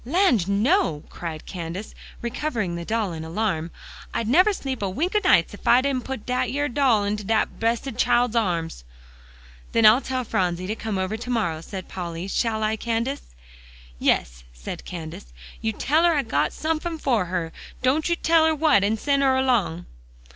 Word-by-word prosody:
"Land, 260 - +2
no!" 205 - +2
cried 160 -3 -6
Candace, 180 +3 -6 0.3
recovering 235 - -2
the 170 - -5
doll 215 -1 -1
in 160 -1 -6
alarm; 165 -1 -2 0.5
"I'd 230 - -1
never 365 - +5
sleep 270 - -4
a 200 - 0
week 330 - -2
o' - - +6
nights - - +4
ef - - -10
I 245 - +6
didn't 265 -2 -1
put 265 -5 -5
dat 250 0 0
yere 290 +1 -1
doll 245 -5 +3
into 205 +1 -2
dat 220 +2 0
bressed 230 +2 -1
child's 245 -1 +2
arms." 170 - -1 0.9
"Then 230 -1 +4
I'll 220 +5 +7
tell 260 -2 -2
Phronsie 180 -5 -1
to 210 +4 -2
come 220 -3 -3
over 190 +3 -2
to 245 +2 -8
morrow," 170 -10 0
said 190 +2 -7
Polly. 175 -1 -5
"Shall 220 +1 0
I, 215 +1 0
Candace?" 235 - -3 0.6
"Yes," - - +1
said - - -8
Candace, 160 - -8 0.3
"you 220 - 0
tell 300 +9 +1
her 340 -2 +4
I 285 - +1
got 150 -9 0
somefin' 320 +1 -2
fer 245 -10 +1
her; 175 -2 -3 0.3
don't 290 +6 +2
you 340 - +2
tell 330 -1 +3
her 320 - +2
what, 295 -9 +4
an' 215 +2 +1
send 280 +4 +1
her 265 -1 +3
along." 205 -11 +1
225 Hz, 185 wpm, -24 LUFS, 180-265 Hz, 0.9 s, I'll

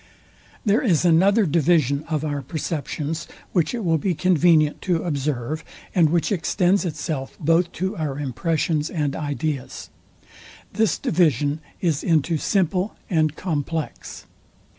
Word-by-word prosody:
There 210 +2 +3
is 180 - +2
another 195 +6 +4
division 150 -3 +2
of 155 -1 -1
our 145 -2 -2
perceptions, 155 +2 -4 0.2
which 175 +5 +1
it 230 - -4
will 165 -2 +2
be 180 +2 0
convenient 165 -3 +3
to 175 -4 0
observe, 145 -1 -2 0.3
and 170 -5 +4
which 170 +4 +1
extends 185 +1 +1
itself 150 -4 -4
both 165 +2 +2
to 190 +2 -2
our 150 -4 -2
impressions 150 +3 -1
and 150 -4 -1
ideas. 145 -2 -4 0.8
This 220 -2 +2
division 150 -3 +1 0.2
is 160 -5 0
into 160 -1 +2
SIMPLE 190 +2 0 0.2
and 155 -3 +2
COMPLEX. 160 -2 -4
160 Hz, 125 wpm, -23 LUFS, 150-180 Hz, 0.8 s, another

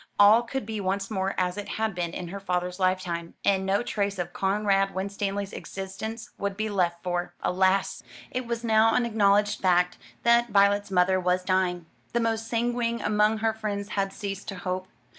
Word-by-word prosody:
All 210 +3 +7
could 250 0 -4
be 215 -1 -4
once 195 +2 -2
more 195 -1 -1
as 180 +1 0
it 205 - -6
had 220 -1 0
been 175 -1 -2
in 175 0 -6
her 200 +3 -6
father's 180 -1 -2
lifetime; 185 -3 -1
and 190 -1 +2
no 200 +4 +2
trace 200 -3 -1
of 180 - -4
Conrad 195 0 +1
Winstanley's 200 +1 -3
existence 200 +4 -6
would 200 -1 -2
be 215 0 -1
left; 175 -4 0
for, 175 -1 -2
alas! 190 +1 +1 0.3
it 255 -1 -3
was 235 0 -3
now 225 0 +4
an 245 - +2
acknowledged 205 -2 +2
fact 180 -1 +2 0.2
that 235 0 +4
Violet's 205 0 +3
mother 185 0 +3
was 180 0 +1
dying. 185 -2 0 0.3
The 235 - +2
most 225 -1 -1
sanguine 235 0 0
among 210 +1 +2
her 220 - +3
friends 205 -2 -4
had 195 -1 -1
ceased 195 0 -6
to 195 - -4
hope. 185 +1 -3
200 Hz, 180 wpm, -27 LUFS, 185-220 Hz, 0.3 s, All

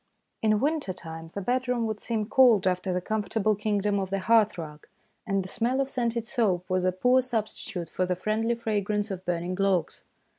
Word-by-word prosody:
In 215 -1 +3
winter 290 -6 0
time 165 -2 -9
the 200 - -2
bedroom 250 +1 0
would 215 -1 -3
seem 225 -3 -2
cold 240 -6 +5
after 185 0 0
the 180 0 -1
comfortable 215 +1 0
kingdom 205 -1 0
of 190 -1 -3
the 195 - 0
hearth 215 +1 +3
rug, 150 -2 -8 0.4
and 195 -2 +1
the - - -8
smell 240 +7 0
of 275 0 -1
scented 235 -3 -1
soap 205 -8 0
was 185 0 +1
a 185 - +3
poor 250 +8 +3
substitute 220 -6 -3
for 185 +3 -1
the 180 - 0
friendly 220 +5 0
fragrance 210 -2 -1
of 185 -1 -5
burning 175 +1 -2
logs. 190 -4 0
210 Hz, 190 wpm, -27 LUFS, 185-230 Hz, 0.4 s, cold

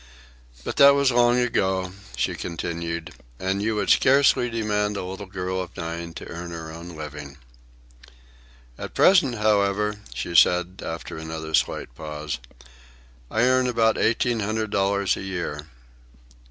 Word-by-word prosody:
"But - - -5
that 140 0 +8
was 140 -2 +3
long 120 0 +4
ago," 95 -6 0 0.2
she - - 0
continued. 85 -1 -4 0.3
"And 95 +1 -1
you 110 +1 0
would 105 - +1
scarcely 130 -2 +4
demand 105 -2 -1
a 100 - -3
little 95 +2 -7
girl 95 0 -3
of 90 0 -9
nine 85 -1 -5
to - - -8
earn 85 +1 -7
her 80 -1 -7
own 85 +1 -9
living." 75 -2 -8 1.4
"At - - -7
present, 165 -10 +5
however," 105 -1 +1 0.2
she 85 - -4
said, 90 +2 +4
after 80 -1 -6
another 80 0 -6
slight 70 - 0
pause, 75 -1 -5 0.9
"I 110 - +1
earn 130 0 +3
about 115 -2 +2
eighteen 115 +1 +1
hundred 110 +1 -2
dollars 100 0 +1
a - - -6
year." 85 -6 -4
95 Hz, 140 wpm, -24 LUFS, 85-110 Hz, 1.4 s, that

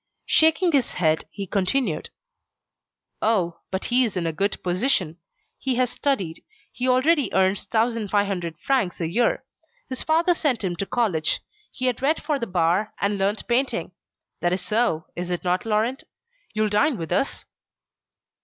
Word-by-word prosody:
Shaking 320 +3 +4
his 275 -5 +1
head, 160 -3 +1
he 200 - -6
continued: 195 - 0 1.1
"Oh! 180 -7 +1
but 190 0 -3
he 250 +1 +4
is 215 -6 -1
in 175 - -1
a 165 - -1
good 195 +6 0
position. 180 - 0 0.4
He 265 -2 0
has 250 0 +1
studied. 195 - -1 0.3
He 250 - -2
already 260 +1 +3
earns 190 +1 +2
1,500 205 -7 0
francs 250 - 0
a 165 - -1
year. 235 +11 +1 0.5
His 255 - -3
father 330 +3 +3
sent 275 -9 0
him 180 -2 -1
to 195 - -2
college. 210 -11 0 0.3
He 255 - -4
had 250 0 0
read 300 +4 +2
for 295 -2 0
the 235 - -3
bar, 180 +3 +1
and 200 0 0
learnt 200 +3 0
painting. 250 +3 0 0.5
That 175 0 +1
is 180 0 -2
so, 215 -8 +1
is 175 +1 -4
it 175 -1 -2
not, 180 +3 0
Laurent? 225 +5 0 0.5
You'll 215 0 +2
dine 255 +6 +2
with 165 -2 -6
us?" 225 +10 -1
210 Hz, 160 wpm, -24 LUFS, 180-255 Hz, 1.1 s, Shaking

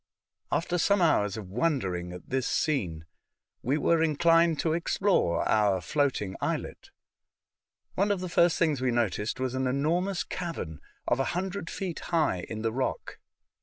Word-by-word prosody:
After 175 +1 0
some 200 +4 +3
hours 105 - +2
of 100 -4 -8
wondering 95 - -1
at 90 0 -10
this 130 -1 0
scene, 90 - -1 0.6
we 135 +5 +1
were 160 +2 +2
inclined 165 +1 +3
to 160 - +1
explore 170 - +1
our 105 -3 +3
floating 105 - -1
islet. - - -3 1.0
One 200 +2 +1
of 200 -2 +1
the 185 - -4
first 170 -1 +3
things 155 -6 +1
we 130 - +1
noticed 115 -1 -1
was 130 -1 -1
an 130 0 0
enormous 170 +8 0
cavern 90 - -5 0.3
of 120 - +2
a - - +3
hundred 190 -1 -3
feet 185 -4 -4
high 155 - +1
in 110 0 -5
the 115 - +1
rock. 130 +1 -3
140 Hz, 155 wpm, -28 LUFS, 105-170 Hz, 1.0 s, some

